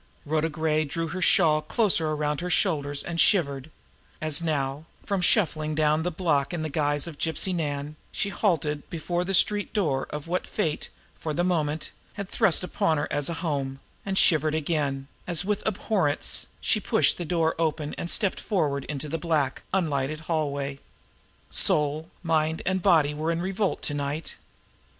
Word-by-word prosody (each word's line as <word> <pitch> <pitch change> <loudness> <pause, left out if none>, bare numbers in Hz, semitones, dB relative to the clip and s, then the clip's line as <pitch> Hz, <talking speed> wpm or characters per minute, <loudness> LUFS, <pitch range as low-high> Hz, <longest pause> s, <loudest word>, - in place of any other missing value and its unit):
Rhoda 155 +2 +1
Gray 155 0 +1
drew 165 +2 -3
her 185 +4 -4
shawl 155 -4 +4
closer 165 -1 +1
around 150 0 -1
her 180 - -3
shoulders 145 -7 +1
and 170 -1 -1
shivered, 140 -8 +2 0.5
as 155 +1 +1
now, 145 -2 -1 0.2
from 200 -2 0
shuffling 155 -5 +2
down 155 0 +3
the 175 - 0
block 155 -3 0
in 160 - -3
the 155 - -3
guise 145 -1 +1
of 165 -4 -8
Gypsy 165 +3 0
Nan, 145 -3 -2 0.2
she 200 - -1
halted 160 -7 0
before 175 +2 -2
the 195 +1 +1
street 205 +2 +2
door 150 -11 0
of 150 +1 -6
what 180 +2 -1
fate, 155 -2 -2 0.3
for 155 -2 -3
the 175 - +1
moment, 160 -4 0 0.2
had 200 -1 -5
thrust 195 -4 +3
upon 180 -3 +1
her 145 - -1
as 145 0 0
a 170 - -2
home; 135 -3 -2 0.2
and 195 -1 -2
shivered 155 -4 +4
again, 145 -3 -1 0.2
as, 175 +1 0
with 210 0 0
abhorrence, 190 -7 +1
she - - +2
pushed - - +2
the - - -1
door 165 -1 +1
open 155 -2 -1
and 170 - -4
stepped 200 +1 +1
forward 150 -9 0
into 150 0 -4
the 165 +2 -3
black, 150 -5 0
unlighted 155 -5 0
hallway. 140 -4 -2 0.7
Soul, 150 +2 +2
mind 160 -1 +1
and 190 0 +1
body 160 -6 +4
were 155 +2 -1
in 165 - -1
revolt 195 +2 -1
to 145 - 0
night. 145 +2 -3
155 Hz, 170 wpm, -26 LUFS, 145-175 Hz, 0.7 s, shawl